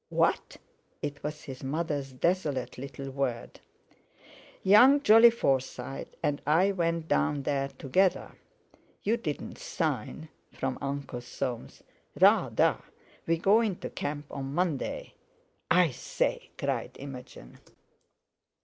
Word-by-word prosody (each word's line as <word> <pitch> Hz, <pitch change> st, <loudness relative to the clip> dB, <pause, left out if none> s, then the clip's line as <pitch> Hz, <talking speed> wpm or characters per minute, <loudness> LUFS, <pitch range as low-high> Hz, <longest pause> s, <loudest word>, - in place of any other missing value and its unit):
"What!" -, -, +1 dB, 0.5 s
It 145 Hz, -1 st, -4 dB
was 150 Hz, +1 st, -5 dB
his 135 Hz, -2 st, -9 dB
mother's 145 Hz, -1 st, -2 dB
desolate 135 Hz, -4 st, -1 dB
little 135 Hz, 0 st, -7 dB
word. 130 Hz, -3 st, -3 dB, 1.0 s
"Young 245 Hz, +9 st, +7 dB
Jolly 225 Hz, -1 st, +8 dB
Forsyte 135 Hz, -, -2 dB
and 145 Hz, 0 st, 0 dB
I 175 Hz, +6 st, +4 dB
went 170 Hz, -3 st, -1 dB
down 135 Hz, -, +1 dB
there 135 Hz, 0 st, 0 dB
together." 180 Hz, +8 st, 0 dB, 0.7 s
"You 220 Hz, +3 st, +2 dB
didn't 160 Hz, -11 st, -5 dB
sign?" 155 Hz, 0 st, -3 dB, 0.2 s
from 130 Hz, -1 st, -3 dB
Uncle 140 Hz, -3 st, -4 dB
Soames. 120 Hz, 0 st, -5 dB, 0.4 s
"Rather! -, -, +4 dB, 0.5 s
We 165 Hz, 0 st, +2 dB
go 200 Hz, +7 st, +4 dB
into 210 Hz, -6 st, -3 dB
camp 145 Hz, 0 st, -4 dB
on 135 Hz, 0 st, -5 dB
Monday." 175 Hz, -6 st, -2 dB, 0.6 s
"I 180 Hz, -4 st, +4 dB
say!" 120 Hz, -, -2 dB
cried -, -, -3 dB
Imogen. 125 Hz, -, -10 dB
145 Hz, 110 wpm, -29 LUFS, 135-175 Hz, 1.0 s, Jolly